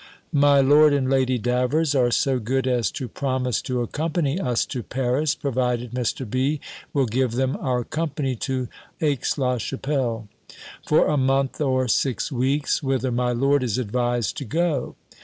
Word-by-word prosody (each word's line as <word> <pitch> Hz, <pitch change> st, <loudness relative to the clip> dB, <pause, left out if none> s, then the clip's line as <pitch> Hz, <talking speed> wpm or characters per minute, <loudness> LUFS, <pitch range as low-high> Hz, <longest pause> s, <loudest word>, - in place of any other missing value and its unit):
My 145 Hz, -1 st, +5 dB
Lord 145 Hz, +2 st, +6 dB
and 135 Hz, -2 st, 0 dB
Lady 130 Hz, -1 st, +2 dB
Davers 125 Hz, +6 st, +1 dB
are 125 Hz, -3 st, +3 dB
so 130 Hz, +1 st, +1 dB
good 130 Hz, +4 st, -1 dB
as 125 Hz, -3 st, +1 dB
to 130 Hz, -, -4 dB
promise 130 Hz, -3 st, -1 dB
to 125 Hz, -1 st, -2 dB
accompany 155 Hz, -, -1 dB
us 125 Hz, -9 st, 0 dB
to 125 Hz, -, -5 dB
Paris, 130 Hz, +5 st, 0 dB
provided 125 Hz, -3 st, -1 dB
Mr. 125 Hz, +1 st, -2 dB
B. 135 Hz, +7 st, 0 dB, 0.3 s
will 140 Hz, -2 st, +2 dB
give 125 Hz, +1 st, 0 dB
them 130 Hz, +2 st, 0 dB
our 125 Hz, -2 st, -1 dB
company 145 Hz, -2 st, -2 dB
to 130 Hz, +1 st, -2 dB, 0.3 s
Aix 145 Hz, -3 st, 0 dB
la 125 Hz, -3 st, 0 dB
Chapelle, 125 Hz, -3 st, -2 dB, 0.6 s
for 155 Hz, -, +4 dB
a 150 Hz, -, +1 dB
month 135 Hz, +1 st, +1 dB
or 130 Hz, -3 st, +1 dB
six 130 Hz, +5 st, 0 dB
weeks, 135 Hz, +3 st, 0 dB
whither 130 Hz, -2 st, 0 dB
my 125 Hz, +1 st, 0 dB
lord 135 Hz, +3 st, +2 dB
is 120 Hz, -4 st, -1 dB
advised 120 Hz, -2 st, -1 dB
to 140 Hz, -, -4 dB
go. 155 Hz, 0 st, -1 dB
130 Hz, 160 wpm, -23 LUFS, 125-140 Hz, 0.6 s, Lord